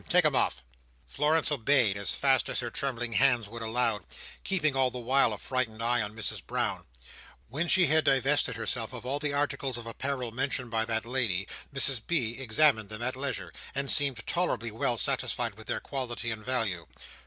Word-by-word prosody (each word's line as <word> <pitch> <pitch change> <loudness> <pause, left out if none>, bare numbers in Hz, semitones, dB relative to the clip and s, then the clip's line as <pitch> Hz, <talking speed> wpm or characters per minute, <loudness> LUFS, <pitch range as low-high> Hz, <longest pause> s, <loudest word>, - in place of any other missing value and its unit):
Take - - +5
'em - - +3
off." - - 0 0.4
Florence 150 - +1
obeyed, 125 -6 +3
as 100 0 -2
fast 135 -1 +2
as - - -1
her 120 -1 -4
trembling 120 -3 -2
hands 125 -2 +3
would 115 +2 -8
allow; 115 -1 0 0.4
keeping, 155 -7 0
all 130 -1 +3
the 125 - -7
while, 125 0 +3
a 105 - -4
frightened 115 -2 -2
eye 120 0 +2
on 105 0 -5
Mrs 110 -2 -3
Brown. - - -2 0.6
When 155 +8 -2
she 180 +1 +6
had 155 +1 +4
divested 135 +2 +2
herself 115 0 -1
of 125 -1 -8
all 140 +3 -1
the 145 0 -1
articles 140 -3 -1
of 120 - -8
apparel 125 +1 -3
mentioned 130 0 -2
by 110 -1 +1
that 110 0 -1
lady, 115 -7 -1 0.2
Mrs 135 -3 +1
B. 125 -8 -1
examined 120 -3 +3
them 110 +2 -5
at 125 +1 0
leisure, 135 +1 -4 0.2
and 140 0 +1
seemed 140 -6 +3
tolerably 170 - -1
well 115 +2 -1
satisfied - - 0
with - - -12
their - - -1
quality 120 -3 -3
and 110 -1 -6
value. 110 - -1
125 Hz, 190 wpm, -29 LUFS, 115-140 Hz, 0.6 s, she